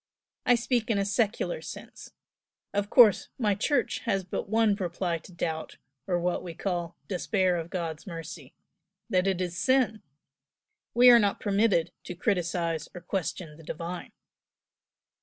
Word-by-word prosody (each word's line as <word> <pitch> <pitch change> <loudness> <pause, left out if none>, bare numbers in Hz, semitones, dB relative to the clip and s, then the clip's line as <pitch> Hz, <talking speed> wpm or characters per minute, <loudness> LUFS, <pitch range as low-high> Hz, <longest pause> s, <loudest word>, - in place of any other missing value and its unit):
I 245 - +7
speak 240 -1 0
in 220 - +2
a 200 - +1
secular 225 - 0
sense, - - -9 0.6
of 205 0 0
course 225 -6 +6
my 210 -5 +2
Church 245 +5 0
has 195 -1 +1
but 185 +2 -4
one 220 -1 +3
reply 175 -3 -2
to 165 - -15
doubt, 160 -2 -4 0.3
or 175 -2 +1
what 175 +1 0
we 170 -2 -7
call 175 -2 -3
'despair 185 -1 +1
of 165 -1 -4
God's 165 -3 -4
mercy' 165 -5 -8 0.6
that 185 +1 +3
it 190 -2 +1
is 180 -2 -2
sin. 230 0 +2 0.9
We 245 +1 +9
are 240 - +8
not 205 -2 +1
permitted 200 -4 +2
to 180 - -6
criticise 170 -4 -1
or 180 - -7
to - - -31
question 170 -4 -3
the 165 - -14
Divine." 170 +3 -6
185 Hz, 155 wpm, -28 LUFS, 170-210 Hz, 0.9 s, We